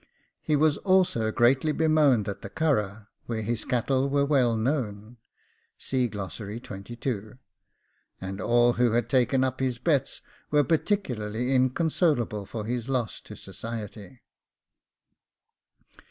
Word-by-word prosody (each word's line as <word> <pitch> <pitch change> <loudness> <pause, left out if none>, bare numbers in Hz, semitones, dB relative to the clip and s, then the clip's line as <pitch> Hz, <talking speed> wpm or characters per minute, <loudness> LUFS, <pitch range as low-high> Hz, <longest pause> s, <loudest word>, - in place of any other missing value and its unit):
He 155 - +1
was 150 0 +3
also 185 - +2
greatly 130 +6 +3
bemoaned 150 -8 +3
at 100 - -5
the 100 - -7
Curragh, 110 -8 -1 0.2
where 110 -2 -3
his 115 +1 -2
cattle 130 +2 +1
were 140 0 +2
well 130 -6 +2
known; 110 -3 -2 0.7
and 125 -5 0
all 100 -1 -3 2.5
who 120 -1 +2
had 120 0 +1
taken 130 +1 +2
up 130 0 -1
his 130 -2 -1
bets 140 0 0 0.3
were 150 -1 +4
particularly 125 - -1
inconsolable 130 - +1
for 110 -1 -5
his 120 +2 -3
loss 125 -5 -2
to - - -11
society. 110 0 -8
125 Hz, 110 wpm, -27 LUFS, 110-145 Hz, 2.5 s, were